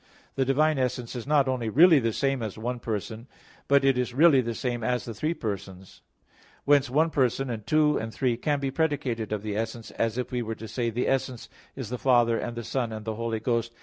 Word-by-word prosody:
The 135 Hz, -, 0 dB
divine 150 Hz, +2 st, +2 dB
essence 125 Hz, -1 st, -2 dB
is 120 Hz, +1 st, -6 dB
not 145 Hz, -2 st, +3 dB
only 125 Hz, -4 st, -1 dB
really 160 Hz, -, +6 dB
the 115 Hz, -2 st, 0 dB
same 135 Hz, +2 st, 0 dB
as 110 Hz, -3 st, -5 dB
one 120 Hz, +3 st, -3 dB
person, 110 Hz, +1 st, -5 dB, 0.4 s
but 140 Hz, -1 st, +4 dB
it 135 Hz, -2 st, +3 dB
is 125 Hz, -1 st, -2 dB
really 145 Hz, -2 st, +6 dB
the 115 Hz, -1 st, -4 dB
same 120 Hz, -1 st, -3 dB
as 125 Hz, +2 st, -1 dB
the 115 Hz, -, -6 dB
three 155 Hz, +9 st, -2 dB
persons. 95 Hz, -, -6 dB, 0.6 s
Whence, 145 Hz, -1 st, +4 dB
one 155 Hz, +5 st, +2 dB
person, 135 Hz, -1 st, 0 dB
and 110 Hz, -2 st, -6 dB
two, 150 Hz, -1 st, +3 dB
and 110 Hz, 0 st, -5 dB
three, 125 Hz, 0 st, 0 dB
can 145 Hz, +4 st, -1 dB
be 135 Hz, -1 st, -2 dB
predicated 135 Hz, -8 st, -1 dB
of 105 Hz, -1 st, -2 dB
the 105 Hz, -1 st, -3 dB
essence 115 Hz, +1 st, -4 dB
as 115 Hz, +1 st, -1 dB
if 125 Hz, -, -3 dB
we 125 Hz, -1 st, -1 dB
were 115 Hz, -1 st, -4 dB
to 110 Hz, +1 st, -9 dB
say, 115 Hz, +2 st, -2 dB
"The 120 Hz, +2 st, -2 dB
essence 130 Hz, -3 st, -2 dB, 0.3 s
is 130 Hz, -5 st, -6 dB
the 125 Hz, -, -3 dB
Father, 120 Hz, -3 st, +3 dB
and 120 Hz, -1 st, -5 dB
the 120 Hz, -, -4 dB
Son, 120 Hz, 0 st, -2 dB
and 110 Hz, -1 st, -7 dB
the 110 Hz, -, -2 dB
Holy 115 Hz, 0 st, -3 dB
Ghost." 115 Hz, 0 st, -1 dB
120 Hz, 230 wpm, -26 LUFS, 115-135 Hz, 0.6 s, really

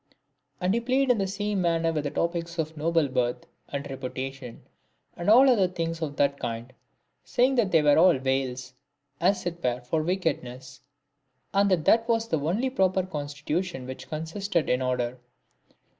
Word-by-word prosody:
And 180 Hz, +1 st, +1 dB
he 235 Hz, -, +2 dB
played 260 Hz, +2 st, +2 dB
in 235 Hz, -, +1 dB
the 195 Hz, -, 0 dB
same 205 Hz, 0 st, -2 dB
manner 165 Hz, -1 st, +1 dB
with 150 Hz, -2 st, -2 dB
the -, -, 0 dB
topics 170 Hz, +2 st, -2 dB
of 160 Hz, 0 st, -2 dB
noble 160 Hz, 0 st, +1 dB
birth, 125 Hz, -1 st, -1 dB, 0.2 s
and 140 Hz, 0 st, -4 dB
reputation, 130 Hz, -1 st, -6 dB, 0.5 s
and 175 Hz, +3 st, -2 dB
all 240 Hz, -4 st, +6 dB
things 165 Hz, -2 st, -4 dB
of 145 Hz, -3 st, -3 dB
that 140 Hz, -1 st, +1 dB
kind, 115 Hz, +2 st, -5 dB, 0.5 s
saying 255 Hz, +2 st, +2 dB
that 220 Hz, -5 st, +3 dB
they 160 Hz, -2 st, +4 dB
were 145 Hz, +1 st, +5 dB
all 175 Hz, -3 st, +6 dB
veils, 130 Hz, -1 st, -2 dB, 0.5 s
as 185 Hz, +2 st, +1 dB
it 170 Hz, -1 st, -4 dB
were, 125 Hz, 0 st, 0 dB
for 140 Hz, +6 st, -1 dB
wickedness; 135 Hz, -8 st, -3 dB, 0.7 s
and 200 Hz, 0 st, +3 dB
that 180 Hz, -5 st, +1 dB
that 230 Hz, +1 st, +4 dB
was 230 Hz, -1 st, +1 dB
the 160 Hz, -, 0 dB
only 200 Hz, -, 0 dB
proper 190 Hz, -6 st, +2 dB
constitution 150 Hz, -1 st, -4 dB
which 130 Hz, 0 st, -8 dB
consisted, 165 Hz, +3 st, -2 dB
in 125 Hz, +1 st, +1 dB
order. 125 Hz, -1 st, -1 dB
165 Hz, 165 wpm, -26 LUFS, 135-190 Hz, 0.7 s, all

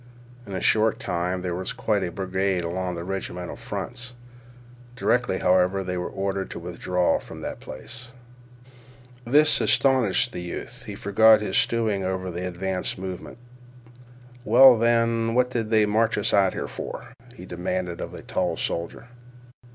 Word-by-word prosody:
In 100 Hz, -, -7 dB
a 95 Hz, -, -3 dB
short 110 Hz, 0 st, +3 dB
time 90 Hz, +1 st, -2 dB
there 90 Hz, -1 st, -2 dB
was 90 Hz, +2 st, -4 dB
quite 105 Hz, -2 st, 0 dB
a 90 Hz, -, -3 dB
barricade 95 Hz, 0 st, -1 dB
along 90 Hz, +1 st, -3 dB
the 85 Hz, -, -5 dB
regimental 90 Hz, -1 st, -5 dB
fronts. 120 Hz, +1 st, -6 dB, 0.8 s
Directly, 125 Hz, -6 st, +1 dB
however, 95 Hz, +1 st, +2 dB
they 90 Hz, -1 st, -3 dB
were 90 Hz, 0 st, -3 dB
ordered 95 Hz, 0 st, -3 dB
to -, -, -6 dB
withdraw 90 Hz, +1 st, 0 dB
from -, -, -11 dB
that -, -, -5 dB
place. 120 Hz, -, -9 dB, 1.1 s
This 150 Hz, +5 st, +5 dB
astounded 130 Hz, -8 st, +3 dB, 0.2 s
the 90 Hz, -, -6 dB
youth. 90 Hz, 0 st, -7 dB
He -, -, -7 dB
forgot 110 Hz, +2 st, +5 dB
his 105 Hz, -, -3 dB
stewing 110 Hz, -4 st, +1 dB
over 95 Hz, 0 st, -2 dB
the 90 Hz, +2 st, -4 dB
advance 90 Hz, +1 st, -3 dB
movement. 95 Hz, +3 st, -7 dB, 1.1 s
"Well, 130 Hz, -1 st, +8 dB
then, 115 Hz, 0 st, +2 dB
what 125 Hz, 0 st, +2 dB
did 115 Hz, -3 st, -2 dB
they 110 Hz, -1 st, +4 dB
march 110 Hz, +2 st, +1 dB
us 105 Hz, -, +1 dB
out 95 Hz, -2 st, +4 dB
here -, -, -4 dB
for?" -, -, -7 dB, 0.2 s
he 90 Hz, -, -10 dB
demanded 90 Hz, 0 st, -3 dB
of -, -, -5 dB
the -, -, -10 dB
tall -, -, -1 dB
soldier. 85 Hz, +7 st, -4 dB
95 Hz, 155 wpm, -25 LUFS, 90-115 Hz, 1.1 s, Well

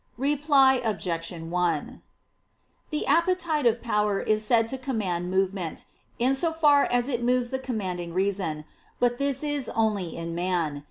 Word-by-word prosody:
Reply 275 Hz, -1 st, +3 dB
Obj. 175 Hz, -7 st, -2 dB
1: 170 Hz, -1 st, -2 dB, 0.9 s
The 305 Hz, -1 st, -2 dB
appetitive 330 Hz, -9 st, +2 dB
power 210 Hz, -3 st, +1 dB
is 215 Hz, 0 st, 0 dB
said 225 Hz, +1 st, +3 dB
to 265 Hz, -, -4 dB
command 195 Hz, -10 st, -2 dB
movement, 190 Hz, -2 st, -2 dB, 0.3 s
in 255 Hz, +3 st, +2 dB
so 325 Hz, +5 st, +1 dB
far 295 Hz, -3 st, +4 dB
as 245 Hz, 0 st, +1 dB
it 245 Hz, -4 st, -1 dB
moves 245 Hz, 0 st, +1 dB
the 265 Hz, -, -1 dB
commanding 185 Hz, -9 st, -4 dB
reason. 185 Hz, -4 st, -1 dB, 0.3 s
But 245 Hz, 0 st, +1 dB
this 280 Hz, 0 st, -1 dB
is 290 Hz, -3 st, -1 dB
only 210 Hz, -6 st, -1 dB
in 165 Hz, 0 st, -5 dB
man. 170 Hz, -4 st, -1 dB
225 Hz, 145 wpm, -26 LUFS, 180-270 Hz, 0.9 s, far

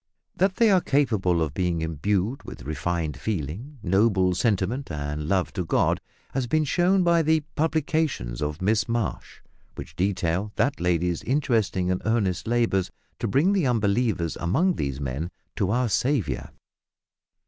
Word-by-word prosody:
That 190 Hz, 0 st, +2 dB
they 230 Hz, -3 st, +4 dB
are 185 Hz, -2 st, +5 dB
capable 105 Hz, -, +2 dB
of 75 Hz, -3 st, -3 dB
being 90 Hz, -1 st, 0 dB
imbued 95 Hz, -, -1 dB
with -, -, -10 dB
refined 80 Hz, +1 st, -2 dB
feeling, 110 Hz, -, -4 dB
noble 95 Hz, -1 st, +3 dB
sentiment, 110 Hz, +5 st, 0 dB
and 75 Hz, 0 st, -4 dB
love 95 Hz, 0 st, 0 dB
to 90 Hz, -, -2 dB
God, 80 Hz, -, +1 dB, 0.3 s
has 130 Hz, -2 st, -1 dB
been 155 Hz, +4 st, +2 dB
shown 180 Hz, +5 st, +2 dB
by 170 Hz, -1 st, +4 dB
the 160 Hz, 0 st, +2 dB
publications 155 Hz, -, -1 dB
of 75 Hz, +4 st, -3 dB
Miss 110 Hz, +3 st, +2 dB
Marsh, 115 Hz, -4 st, -3 dB, 0.3 s
which -, -, -9 dB
detail 95 Hz, +1 st, 0 dB
that 140 Hz, +1 st, +1 dB
lady's 90 Hz, -1 st, 0 dB
interesting 110 Hz, -9 st, +1 dB
and 90 Hz, -, -1 dB
earnest 100 Hz, -6 st, 0 dB
labours 115 Hz, -6 st, +1 dB, 0.3 s
to -, -, -1 dB
bring 150 Hz, -, +3 dB
the 185 Hz, -9 st, +2 dB
unbelievers 105 Hz, -6 st, +1 dB
among 155 Hz, -, +2 dB
these 70 Hz, -, -3 dB
men 70 Hz, +5 st, -3 dB, 0.3 s
to 100 Hz, -4 st, 0 dB
our 120 Hz, +4 st, +1 dB
Saviour. 110 Hz, -, 0 dB
100 Hz, 150 wpm, -25 LUFS, 85-135 Hz, 0.3 s, are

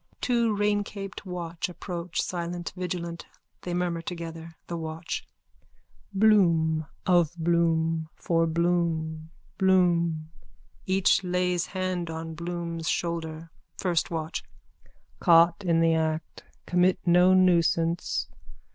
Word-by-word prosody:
Two 235 Hz, -3 st, +1 dB
raincaped 205 Hz, -1 st, -2 dB
watch 175 Hz, 0 st, -4 dB
approach, 175 Hz, -1 st, -4 dB
silent, 175 Hz, -1 st, -4 dB
vigilant. 170 Hz, -2 st, -4 dB, 0.3 s
They 175 Hz, -1 st, -3 dB
murmur 175 Hz, -2 st, -1 dB
together.)_ 165 Hz, -1 st, -7 dB
THE 170 Hz, -, -5 dB
WATCH: 160 Hz, +1 st, -5 dB, 0.8 s
Bloom. 170 Hz, -7 st, +3 dB, 0.2 s
Of 175 Hz, -3 st, +3 dB
Bloom. 165 Hz, -1 st, +1 dB
For 165 Hz, -1 st, +1 dB
Bloom. 160 Hz, -2 st, 0 dB, 0.3 s
Bloom. 170 Hz, -4 st, +2 dB, 0.6 s
(Each 190 Hz, 0 st, +3 dB
lays 180 Hz, -1 st, 0 dB
hand 185 Hz, -3 st, -2 dB
on 160 Hz, 0 st, -5 dB
Bloom's 170 Hz, 0 st, -4 dB
shoulder.) 165 Hz, -1 st, -3 dB, 0.3 s
FIRST 175 Hz, -3 st, 0 dB
WATCH: 160 Hz, 0 st, -3 dB, 0.8 s
Caught 170 Hz, +1 st, +5 dB
in 165 Hz, -1 st, +3 dB
the 165 Hz, 0 st, +4 dB
act. 160 Hz, 0 st, -2 dB, 0.2 s
Commit 180 Hz, +1 st, +3 dB
no 180 Hz, +1 st, +5 dB
nuisance. 170 Hz, -2 st, +2 dB
170 Hz, 100 wpm, -27 LUFS, 165-180 Hz, 0.8 s, Caught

